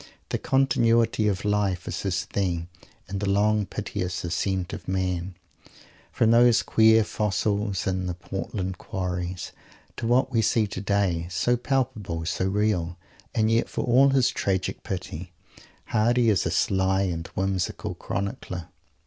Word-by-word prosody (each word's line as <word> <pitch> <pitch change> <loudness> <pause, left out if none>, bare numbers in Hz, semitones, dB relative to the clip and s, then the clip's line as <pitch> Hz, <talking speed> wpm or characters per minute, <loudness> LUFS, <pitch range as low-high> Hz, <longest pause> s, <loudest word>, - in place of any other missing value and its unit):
The - - -1
continuity 115 -4 +2
of 100 -1 -1
life! 100 -3 +1
The 90 -1 -2 0.5
long, 105 +1 +2
piteous 90 -1 -4
"ascent 90 +2 -1
of - - -7
man," 95 -1 -2 0.8
from 115 -1 +3
those 120 0 +5
queer 110 0 +5
fossils 105 -2 -1
in 95 -1 -1
the 90 - -3
Portland 95 +1 -4
Quarries 90 -1 -4 0.5
to 115 - -2
what 125 +2 +3
we 115 - +2
see 110 0 +2
today, 100 -4 -1
so 95 +7 +1
palpable, 110 -10 -2
so 90 - -1
real! 95 -4 0 0.4
And 110 0 +2
yet 115 +1 +2
for - - -2
all 130 +3 +5
his 130 -3 +3
tragic 95 -2 -1
pity, 90 -2 -5
Mr. 85 - -25 0.3
Hardy 115 +2 +3
is 100 - +1
a - - 0
sly 95 0 +2
and 85 -3 -3
whimsical 95 -1 -1
chronicler. 95 -3 -4
100 Hz, 130 wpm, -26 LUFS, 90-110 Hz, 0.8 s, those